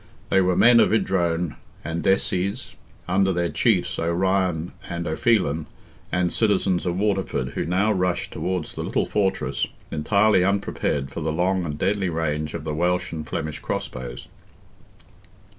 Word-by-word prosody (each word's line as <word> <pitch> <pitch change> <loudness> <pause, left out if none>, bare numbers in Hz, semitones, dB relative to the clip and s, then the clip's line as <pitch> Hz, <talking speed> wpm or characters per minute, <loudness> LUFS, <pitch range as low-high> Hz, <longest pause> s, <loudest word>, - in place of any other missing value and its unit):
They 95 - +4
were 90 -1 +2
men 120 0 +7
of - - +4
Idrone 85 - 0 0.3
and 85 +1 -3
Desies, 95 +3 0 0.3
under 95 +1 +2
their 85 -1 0
chiefs, - - +1
O'Ryan 90 0 0 0.2
and 85 -1 -3
O'Phelan, 80 - +1 0.4
and 90 -1 +1
citizens 95 -4 +1
of 90 0 -1
Waterford, 100 -1 0
who - - -3
now 95 +5 +2
rushed 90 -2 -1
towards 90 -3 -3
the - - -5
little - - 0
fortress, 100 -2 0 0.2
entirely 100 +5 +3
unprepared 90 -8 -1
for 85 - -5
the 80 0 -1
long 90 +3 +1
and 75 -3 -4
deadly 95 +2 0
range 75 -2 -2
of - - -5
the 75 - -3
Welsh 90 +3 0
and 80 -1 -5
Flemish 80 -1 -4
crossbows. 60 -1 -5
90 Hz, 145 wpm, -24 LUFS, 80-95 Hz, 0.4 s, men